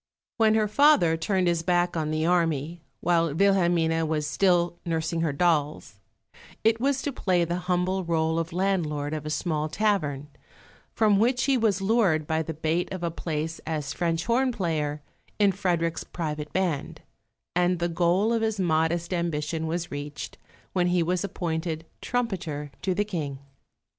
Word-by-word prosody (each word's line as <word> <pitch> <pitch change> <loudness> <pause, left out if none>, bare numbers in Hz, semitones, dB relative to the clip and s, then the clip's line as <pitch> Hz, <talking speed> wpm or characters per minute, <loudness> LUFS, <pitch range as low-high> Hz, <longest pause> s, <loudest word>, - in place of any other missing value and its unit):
When 220 -1 +4
her 215 -1 +2
father 215 - +5
turned 185 +3 0
his 170 -1 +1
back 175 +1 +1
on 155 -2 -1
the 155 +1 0
army, 165 -2 0 0.2
while 165 -3 +2
Wilhelmine 170 -4 +2
was 155 -1 -1
still 175 +1 +2
nursing 165 -1 -1
her 165 -3 +1
dolls, 150 -1 0 0.6
it 225 +1 +3
was 270 0 +1
to 290 - -1
play 180 -7 +1
the 170 +1 -2
humble 185 +1 +1
rôle 160 -1 0
of 165 0 -3
landlord 165 -6 -1
of 155 -1 -4
a - - -2
small 155 -1 -1
tavern, 155 -8 0 0.7
from 210 -3 +4
which 245 +3 +2
he 275 -1 +3
was 215 -5 +1
lured 190 -8 +2
by 160 +1 0
the 160 0 -5
bait 160 +3 -1
of 185 -2 -5
a 170 - 0
place 160 0 -3
as 150 -3 -2
French 170 -1 -1
horn 255 +3 +2
player 155 -8 -2 0.3
in 205 -2 +4
Frederick's 175 -4 -1
private 150 -3 -5
band; 180 -7 -2 0.5
and 180 0 +2
the 170 0 0
goal 175 +6 +2
of 230 - +1
his 220 -2 -1
modest 170 0 +1
ambition 160 -2 -2
was 170 +2 -3
reached 145 +1 -6 0.4
when 180 -1 +2
he 175 -1 +2
was 180 +2 0
appointed 165 -3 -3 0.2
trumpeter 175 - -3
to 185 0 0
the 205 +2 +1
King. 155 -9 -4
170 Hz, 165 wpm, -26 LUFS, 160-190 Hz, 0.7 s, father